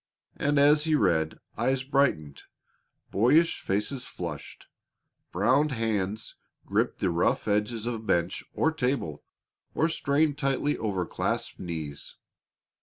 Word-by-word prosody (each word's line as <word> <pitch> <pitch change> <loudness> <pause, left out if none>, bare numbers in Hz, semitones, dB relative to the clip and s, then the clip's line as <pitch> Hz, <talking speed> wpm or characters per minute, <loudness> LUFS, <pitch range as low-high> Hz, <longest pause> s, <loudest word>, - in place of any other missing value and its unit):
And 145 0 0
as 150 +2 +5
he 160 -1 +3
read, 80 - +1 0.2
eyes 130 0 +1
brightened, 130 - 0 0.7
boyish 150 +11 +3
faces 105 +7 -1
flushed, - - -7 0.7
brown 130 - +3
hands 110 -4 -2 0.3
gripped - - 0
the 90 - +2
rough 85 +5 +1
edges 105 +2 0
of 115 -2 -4
bench 85 -1 0
or 160 - +1
table, 125 - -2 0.5
or 160 - +3
strained 145 -1 +1
tightly 140 +1 +1
over 95 -5 -2
clasped - - -3
knees. 80 -5 -6
115 Hz, 115 wpm, -27 LUFS, 95-140 Hz, 0.7 s, as